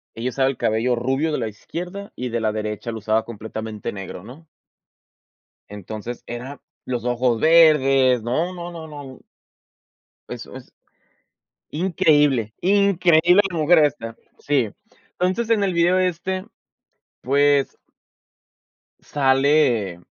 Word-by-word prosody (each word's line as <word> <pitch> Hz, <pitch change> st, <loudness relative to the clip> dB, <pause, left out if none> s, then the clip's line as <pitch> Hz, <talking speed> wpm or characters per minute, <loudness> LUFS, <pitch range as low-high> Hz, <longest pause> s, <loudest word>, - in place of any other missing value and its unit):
Ella 115 Hz, +3 st, -3 dB
usaba 135 Hz, +1 st, +1 dB
el 135 Hz, -, -6 dB
cabello 115 Hz, +3 st, 0 dB
rubio 135 Hz, +6 st, -1 dB
de -, -, -1 dB
la 115 Hz, -3 st, -2 dB
izquierda, 180 Hz, -, -8 dB
y 125 Hz, 0 st, -4 dB
de 115 Hz, 0 st, -2 dB
la 110 Hz, -1 st, 0 dB
derecha, 105 Hz, +2 st, -4 dB
lo 110 Hz, -, -5 dB
usaba 110 Hz, +1 st, 0 dB
completamente 110 Hz, -1 st, -6 dB
negro, 95 Hz, -2 st, -8 dB
¿no? 145 Hz, +8 st, -13 dB, 1.2 s
Entonces, 110 Hz, +4 st, -8 dB
era 125 Hz, +4 st, -7 dB, 0.2 s
los 120 Hz, -3 st, -4 dB
ojos 120 Hz, -1 st, 0 dB
verdes, 135 Hz, -6 st, +5 dB
no, 160 Hz, +11 st, -1 dB
no, 175 Hz, 0 st, -7 dB
no, 165 Hz, -2 st, -8 dB
no 145 Hz, -3 st, -10 dB, 1.1 s
eso -, -, -8 dB
es. -, -, -12 dB, 1.0 s
Increíble, 145 Hz, -, +2 dB
increíble 180 Hz, -2 st, +4 dB
la 170 Hz, -, -4 dB
mujer 160 Hz, +3 st, +4 dB
esta, 130 Hz, -7 st, -1 dB, 0.2 s
sí. 135 Hz, -7 st, 0 dB, 0.5 s
Entonces, 190 Hz, +6 st, -1 dB
en 220 Hz, -3 st, +3 dB
el 190 Hz, -3 st, 0 dB
video 175 Hz, +2 st, +3 dB
este, 185 Hz, +1 st, -2 dB, 0.7 s
pues 140 Hz, +1 st, +2 dB, 1.2 s
sale 135 Hz, -, +1 dB
135 Hz, 120 wpm, -21 LUFS, 115-170 Hz, 1.2 s, verdes